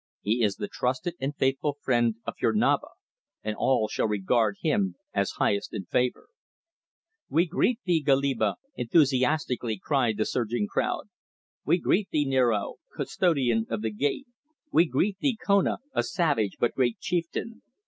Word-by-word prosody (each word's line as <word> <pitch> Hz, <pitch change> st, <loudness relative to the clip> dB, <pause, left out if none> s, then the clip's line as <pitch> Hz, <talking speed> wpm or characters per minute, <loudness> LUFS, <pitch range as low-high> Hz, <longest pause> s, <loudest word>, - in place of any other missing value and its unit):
He 115 Hz, +4 st, +1 dB
is 100 Hz, -3 st, +2 dB
the -, -, -4 dB
trusted 130 Hz, -, -2 dB
and 140 Hz, +2 st, -2 dB
faithful 135 Hz, +2 st, 0 dB
friend 120 Hz, -4 st, +2 dB
of -, -, -3 dB
your 110 Hz, -, +3 dB
Naba, 105 Hz, -, +2 dB, 0.6 s
and 110 Hz, 0 st, -2 dB
all 115 Hz, -3 st, +2 dB
shall 110 Hz, -, -1 dB
regard 105 Hz, +1 st, +1 dB
him 100 Hz, -, +1 dB, 0.2 s
as -, -, 0 dB
highest 100 Hz, 0 st, 0 dB
in 95 Hz, -, -4 dB
favour." 125 Hz, +7 st, -1 dB, 1.0 s
"We 170 Hz, +3 st, +3 dB
greet 225 Hz, +8 st, 0 dB
thee, 170 Hz, -3 st, +2 dB
Goliba!" 140 Hz, -2 st, +2 dB, 0.2 s
enthusiastically 130 Hz, -3 st, +1 dB
cried 120 Hz, -1 st, 0 dB
the 110 Hz, -, +1 dB
surging 120 Hz, -3 st, -1 dB
crowd. -, -, -2 dB, 0.6 s
"We 170 Hz, +4 st, +4 dB
greet 190 Hz, +3 st, +1 dB
thee, 150 Hz, -1 st, +1 dB
Niaro, 125 Hz, -6 st, +1 dB, 0.2 s
Custodian 130 Hz, -11 st, +1 dB
of 115 Hz, -1 st, -3 dB
the 110 Hz, -, -1 dB
Gate! 145 Hz, -, -1 dB, 0.5 s
We 170 Hz, +2 st, +5 dB
greet 195 Hz, +4 st, 0 dB
thee, 255 Hz, -3 st, +1 dB
Kona, 200 Hz, -1 st, +3 dB, 0.2 s
a -, -, +2 dB
savage 140 Hz, -, 0 dB
but 120 Hz, -, +1 dB
great 125 Hz, -3 st, +1 dB
chieftain! 175 Hz, +6 st, -3 dB
130 Hz, 150 wpm, -27 LUFS, 110-160 Hz, 1.0 s, We